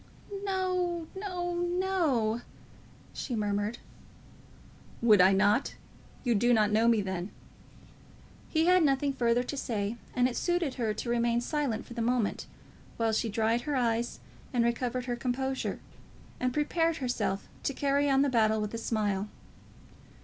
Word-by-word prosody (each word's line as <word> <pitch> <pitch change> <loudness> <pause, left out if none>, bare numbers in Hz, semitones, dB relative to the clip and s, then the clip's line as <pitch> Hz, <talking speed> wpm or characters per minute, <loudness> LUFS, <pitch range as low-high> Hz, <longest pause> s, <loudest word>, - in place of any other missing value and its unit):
"No; 365 -3 -1
no; 360 -3 -3
no;" 345 - 0 0.7
she 245 - -4
murmured. 210 +1 -1 1.2
"Would 215 -5 +6
I 185 +1 +7
not? 205 +6 +2 0.5
You 245 -2 +2
do 240 +3 +3
not 210 -1 +3
know 220 +2 +3
me 230 -2 +4
then." 190 0 -3 1.2
He 320 0 +2
had 365 +1 +5
nothing 280 -1 +2
further 240 -1 +2
to 270 - -5
say, 220 -4 -2 0.2
and 250 0 +4
it 250 - -4
suited 350 -6 0
her 225 -4 -1
to 235 - -4
remain 235 0 +2
silent 250 -3 -2
for 240 - -10
the 235 - -3
moment, 240 -2 0 0.5
while 225 -1 +1
she 225 +1 0
dried 225 +2 +1
her 295 +2 -2
eyes, 235 -1 0 0.3
and 240 -2 +2
recovered 245 +1 -1
her 245 -1 -2
composure, 265 +2 -2 0.6
and 250 0 0
prepared 325 +4 +1
herself 245 -7 -2
to - - -1
carry 280 +1 +1
on 270 0 +4
the - - +2
battle 220 -3 +3
with 210 0 -3
a 230 - -3
smile. 210 -3 -1
245 Hz, 150 wpm, -29 LUFS, 220-285 Hz, 1.2 s, I